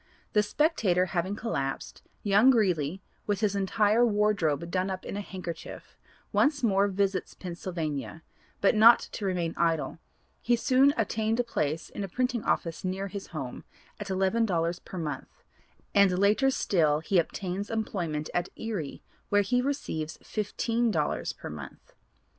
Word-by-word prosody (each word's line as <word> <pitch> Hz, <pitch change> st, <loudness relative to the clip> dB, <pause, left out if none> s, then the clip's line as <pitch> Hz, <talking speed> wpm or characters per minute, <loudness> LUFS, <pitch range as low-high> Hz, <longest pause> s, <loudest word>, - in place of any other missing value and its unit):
The 210 Hz, -, +5 dB
Spectator 210 Hz, -, +2 dB
having 185 Hz, +3 st, 0 dB
collapsed, 140 Hz, -, -3 dB, 0.2 s
young 205 Hz, +5 st, +5 dB
Greeley, 185 Hz, -, +2 dB, 0.2 s
with 205 Hz, -1 st, 0 dB
his 205 Hz, -2 st, +1 dB
entire 210 Hz, +3 st, +3 dB
wardrobe 200 Hz, -8 st, +1 dB
done 185 Hz, +1 st, 0 dB
up 185 Hz, -1 st, -5 dB
in -, -, -5 dB
a 205 Hz, -, -2 dB
handkerchief, 180 Hz, -4 st, -8 dB, 0.4 s
once 285 Hz, -2 st, +2 dB
more 200 Hz, -3 st, +3 dB
visits 195 Hz, -1 st, -1 dB
Pennsylvania, 165 Hz, -4 st, -5 dB, 0.4 s
but 200 Hz, -, +5 dB
not 225 Hz, +2 st, +8 dB
to 210 Hz, -, -5 dB
remain 175 Hz, -3 st, -1 dB
idle; 165 Hz, -1 st, 0 dB, 0.4 s
he 240 Hz, -, +3 dB
soon 265 Hz, +3 st, +4 dB
obtained 225 Hz, +1 st, 0 dB
a -, -, +3 dB
place 160 Hz, -9 st, -2 dB
in 205 Hz, -, -4 dB
a -, -, -3 dB
printing 250 Hz, +3 st, -1 dB
office 165 Hz, -3 st, -1 dB
near 190 Hz, +1 st, -2 dB
his 200 Hz, 0 st, -6 dB
home, 135 Hz, -7 st, -6 dB, 0.4 s
at 205 Hz, -1 st, -6 dB
eleven 190 Hz, +4 st, +2 dB
dollars 170 Hz, -4 st, 0 dB
per 185 Hz, -, -9 dB
month, 150 Hz, -5 st, -6 dB, 0.5 s
and 200 Hz, -3 st, +5 dB
later 210 Hz, +7 st, +4 dB
still 155 Hz, -, +2 dB
he 180 Hz, +3 st, +2 dB
obtains 190 Hz, +3 st, -3 dB
employment 175 Hz, -9 st, -2 dB
at 175 Hz, -, 0 dB
Erie 200 Hz, -11 st, -5 dB, 0.3 s
where 205 Hz, 0 st, +4 dB
he 245 Hz, +5 st, +1 dB
receives 160 Hz, -, -3 dB
fifteen 230 Hz, +3 st, -1 dB
dollars 155 Hz, -7 st, -1 dB
per -, -, -8 dB
month. 75 Hz, -3 st, -10 dB
195 Hz, 150 wpm, -28 LUFS, 170-220 Hz, 0.5 s, not